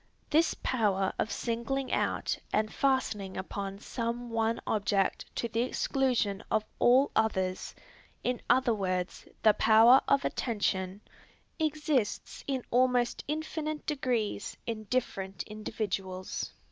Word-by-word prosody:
This 325 +2 +4
power 200 -6 +1
of 220 - 0
singling 255 +3 -2
out - - 0 0.2
and 215 0 0
fastening 220 -8 0
upon 195 +1 -4
some 235 +2 -4
one 225 0 +1
object 205 -2 0
to 235 - -1
the 230 0 -1
exclusion 245 -5 0
of 215 0 +1
all 260 +4 +5
others, 190 -4 0 0.5
in 250 0 -1
other 250 -1 +4
words, 185 -3 -2 0.2
this 215 -2 +7
power 225 +4 +7
of 275 -1 +3
attention 195 -4 -1 0.6
exists 300 -7 -1
in 265 -3 -1
almost 250 -1 +2
infinite 310 0 -3
degrees 245 -8 -1
in 220 -2 -4
different 195 -5 -2
individuals. 195 -3 -4
225 Hz, 115 wpm, -30 LUFS, 200-255 Hz, 0.6 s, this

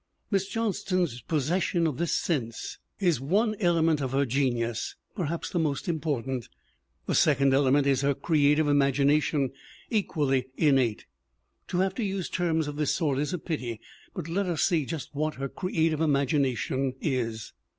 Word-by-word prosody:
Miss 195 -1 +1
Johnston's 185 - -1
possession 165 +3 0
of 150 -5 -1
this 170 0 -1
sense 120 -9 -2 0.2
is 175 -10 +2
one 210 - +1
element 165 -5 +2
of 135 -1 -2
her 140 +1 +2
genius 120 -3 -1 0.2
perhaps 165 -3 -3
the 175 - 0
most 150 -4 -1
important. 135 -7 -2 0.6
The - - -1
second 140 -3 +4
element 140 +1 +4
is 135 -2 +2
her 140 0 +2
creative 150 +1 +3
imagination, 140 0 +2 0.4
equal 175 - 0
ly 130 -2 +2
innate. 135 -8 +2 0.6
To 180 - 0
have 190 0 +1
to 235 - -3
use 195 -3 -2
terms 160 -4 0
of 145 0 -5
this 150 -2 +1
sort 145 -6 0
is 150 +3 -1
a 180 - -1
pity, 125 -9 -4 0.4
but 175 -5 -4
let 190 +4 -1
us 170 -3 0
see 160 -7 +2
just 155 -4 -5
what 155 +2 -1
her 135 +1 -3
"creative 160 -1 0
imagination" 135 -3 +1
is. 115 -6 -2
150 Hz, 160 wpm, -27 LUFS, 135-170 Hz, 0.6 s, second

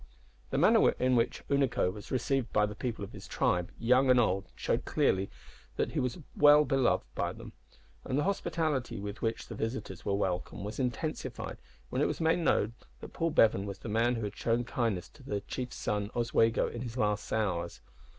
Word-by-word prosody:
The - - -1
manner - - +6
in 125 0 +1
which 115 - 0
Unaco 135 -9 +1
was 105 0 -10
received 130 -1 0
by 105 - +3
the 105 - -5
people 115 0 -4
of 100 - -7
his - - -10
tribe, 90 0 0
young 125 +3 +3
and 125 -1 +6
old, 100 -4 +1
showed - - -1
clearly 95 +1 +1 0.5
that - - -1
he - - -1
was 125 +4 -1 0.2
well 150 0 +7
beloved 135 -1 +2
by - - -1
them; - - -11 0.5
and 130 - -2
the 145 - +2
hospitality 155 - -1
with 100 +2 -6
which 115 0 -1
the - - -7
visitors 110 -6 -4
were 100 - 0
welcomed 95 0 -2
was 105 +5 -6
intensified 130 +5 -3 0.3
when - - 0
it - - +4
was - - -2
made 165 +1 +3
known 115 -9 +2 0.3
that - - -10
Paul 165 0 0
Bevan 110 -8 +3
was 100 -1 -5
the 110 - -8
man 115 +3 +2
who 115 - -3
had 105 0 -4
shown 115 +1 0
kindness 115 -6 -1
to - - -18
their 105 -7 -3
chief's 125 +3 -5
son 105 -1 -2
Oswego 115 -1 +2
in 120 - -6
his 120 0 -6
last 105 -2 0
hours. 90 -6 -1
115 Hz, 200 wpm, -31 LUFS, 105-130 Hz, 0.5 s, well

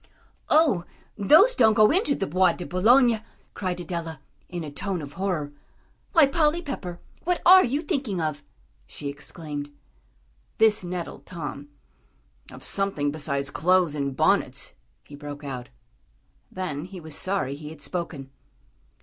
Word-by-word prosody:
"Oh, 300 - +4 0.3
those 315 - +6
don't 220 -4 +4
go 215 0 +6
into 310 -5 +2
the 195 - -2
Bois 185 +1 +3
de 180 - -7
Boulogne," 230 +5 +4 0.3
cried 185 -2 -3
Adela, 170 -4 -5 0.3
in 175 -1 -5
a 150 - -6
tone 190 +4 -3
of 145 -2 -8
horror. 170 -6 -2 0.6
"Why, 325 -5 +7
Polly 300 +3 +2
Pepper, 180 - -5 0.2
what 360 0 0
are 370 +1 +9
you 280 +6 -1
thinking 265 - -2
of?" 155 -2 -2 0.5
she 145 - -6
exclaimed. 145 0 -6 0.9
This 220 -2 +4
nettled 175 -1 -6
Tom. 145 -5 -6 0.8
"Of - - -11
something 195 -8 -1
besides 140 -2 -3
clothes 180 -1 +3
and 140 -2 -2
bonnets," - - +1 0.3
he - - -16
broke 145 0 -8
out. 130 -3 -6 0.8
Then 165 -5 -4
he 185 0 -9
was 160 -3 -7
sorry 190 -8 -1
he 150 +1 -8
had 155 -2 -10
spoken. 160 -7 -5
180 Hz, 140 wpm, -25 LUFS, 145-215 Hz, 0.9 s, are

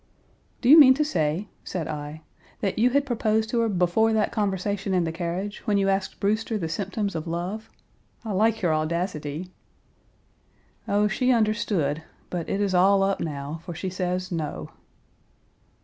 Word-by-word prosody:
"Do 245 - -1
you 310 +3 +10
mean 260 -3 +9
to 300 +2 +1
say," 165 - -1 0.2
said 170 -4 -4
I, 150 0 -6 0.4
"that 195 +1 -1
you 240 +3 +5
had 280 +2 +2
proposed 220 -3 0
to 235 - +1
her 230 -1 +2
before 190 +4 +2
that 215 -1 +1
conversation 200 -1 -1
in 180 - +2
the 165 - -2
carriage, 175 +5 -4
when 205 -1 +3
you 195 0 +2
asked 195 0 -1
Brewster 215 +2 0
the 170 -5 -3
symptoms 200 +3 -2
of 160 0 -4
love? 180 +6 -4 0.6
I 220 - -3
like 220 +2 +1
your 165 -3 +3
audacity." 155 +1 -2 1.4
"Oh, 205 +1 +2
she 250 +6 +1
understood, 210 - +1 0.3
but 175 -3 -3
it 200 - -1
is 200 -2 0
all 195 +2 +5
up 195 0 +1
now, 150 0 -5
for 175 -1 -7
she 185 +3 -4
says, 185 0 -2
'No!' 150 - -4
195 Hz, 165 wpm, -25 LUFS, 170-215 Hz, 1.4 s, you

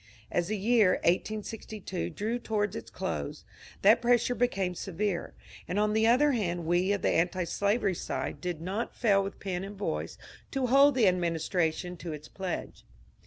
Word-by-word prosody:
As 175 -1 0
the 215 - -1
year 210 -2 +4
1862 210 - -2
drew 225 - -2
toward 210 -3 -1
its - - -7
dose, - - -4 0.4
that 220 +4 +6
pressure 240 0 +3
became 200 -6 0
severe, 190 +1 -3 0.3
and 180 - -2
on 210 0 +2
the 220 +1 +3
other 275 +5 +5
hand 175 -8 -1
we 175 +4 +2
of 200 - -1
the - - +3
antislavery 185 +4 +1
side - - -4
did 175 -3 -3
not 195 +7 -3
fail 200 -4 +3
with 195 - -6
pen 185 -2 -3
and 200 +1 -7
voice 80 - -3 0.3
to 270 -1 -1
hold 275 +3 +6
the 235 -6 +4
administration 175 0 0
to 170 -2 -6
its 150 0 -9
pledge. 190 -2 -5
195 Hz, 165 wpm, -29 LUFS, 175-220 Hz, 0.4 s, that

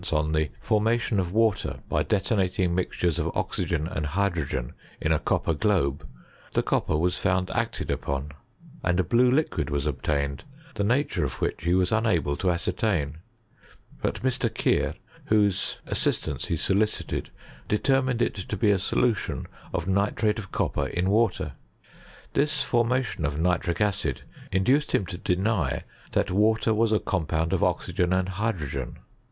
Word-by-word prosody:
on 75 0 +1
the 75 -1 +1
formation 110 0 +1
of 90 -2 -1
water 110 -1 +1
by - - +1
detonating 95 -3 +1
mis 90 -2 0
of - - 0
oxygen 80 -3 -1
and 75 -3 -3
hydrogen 85 -7 -1 0.3
in 80 - 0
a 80 - +3
copper 80 - 0
globo, 75 -5 +1 0.6
copper 75 - +1
was 90 +3 +1
found 90 -1 +1
acted - - -1
upon, 70 +1 -2 0.5
and 90 +1 +2
a - - +4
blue 120 +8 +4
liquid 125 - +1 0.2
obtained, 70 -2 -1 0.3
the 105 -4 -1
nature 125 +8 +1
of - - -1
which - - -3
he 85 +1 +3
wai 95 0 +4
unable 105 -10 +2
to 95 - -2
^rtain; 85 -3 0 0.8
but - - -2
Mr. 130 -1 0
Keir, - - +1 0.3
whose 105 -3 +2
assistance - - -1
he - - -1
soli 100 +3 +3
cited, - - -4 0.4
determined 130 +2 +2
it - - 0
to 100 +1 -5
be 105 +2 +4
a 100 - +2
solution 110 +3 0 0.3
of 85 -3 -2
nitrate 105 +3 +1
of 100 -3 -8
copper - - 0
in 90 +2 0
water. 110 -3 +2 0.8
This 150 0 +1
formation 120 -5 +1
of 70 0 -1
nitric 85 0 +1
acid 100 - 0 0.3
in 95 +1 +2
doced 145 +7 +2
him 95 - +2
to 90 -1 -7
deny 90 - 0 0.3
that - - +1
water 110 +3 +3
was 110 +1 +2
a 110 - +4
compound 80 -2 -1
of - - +2
tKygea 90 0 0
and 95 0 0
hydrogen. 85 - -3
95 Hz, 150 wpm, -26 LUFS, 85-110 Hz, 0.8 s, a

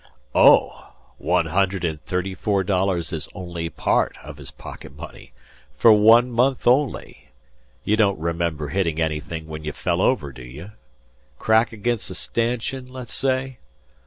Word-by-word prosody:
"Oh! - - +4 0.3
One - - +1
hundred 95 -2 0
and 80 -2 -4
thirty 90 +5 -2
four 100 0 0
dollars 90 -3 0
is 80 -2 -4
only 85 -2 -5
part - - 0
of - - -10
his - - -8
pocket 70 0 -11
money 70 - -11 0.5
for 115 - +7
one 115 +4 +6
month 125 +3 +1
only! 120 - 0 0.5
You 110 - +1
don't 100 -3 +3
remember 85 -3 -2
hittin' 85 -3 -1
anything 80 0 -3
when 80 -1 -8
you 75 -1 -4
fell - - -1
over, 70 -2 +1
do 65 0 -12
you? 75 +11 -10 0.7
Crack 110 +2 +2
agin 115 +2 -1
a - - -3 0.2
stanchion, 125 +2 -2
le's 125 -2 -8
say. 130 -1 -1
95 Hz, 150 wpm, -22 LUFS, 80-115 Hz, 0.7 s, for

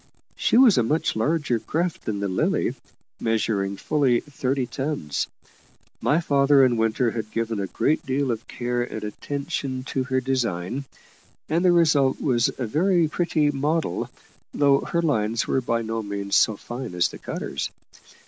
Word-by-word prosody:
She - - +2
was 245 - +7
a - - +5
much 155 +8 0
larger 145 +1 +1
craft 170 +8 -2
than 100 -2 -2
the 100 - 0
Lily, 95 - 0 0.5
measuring 105 -3 0
fully 135 -2 +2
thirty 135 -2 -2
tons. 130 - -3 0.7
My 150 - +3
father 140 -3 +4
and 125 -2 +2
Winter 115 +2 +1
had 110 -2 -4
given 115 -1 -2
a 100 - -2
great 150 +10 0
deal 135 -1 0
of 115 -1 -5
care 120 0 -2
and 110 -3 -4
attention 130 +3 -4
to 130 0 -2
her 130 0 +1
design, 125 -2 -2 0.6
and 165 +3 +1
the 180 - +5
result 150 -6 +3
was 120 -4 +2
a 130 - -2
very 170 - +2
pretty 155 -2 +1
model, 145 - -1 0.5
though 140 -1 +4
her 170 0 -1
lines 115 -7 +1
were 135 - +1
by 115 -1 -1
no 115 0 -2
means 100 -1 -3
so 110 -2 +4
fine 120 -4 -6
as 90 - +2
the - - -10
cutter's. - - -4
130 Hz, 160 wpm, -24 LUFS, 110-145 Hz, 0.7 s, was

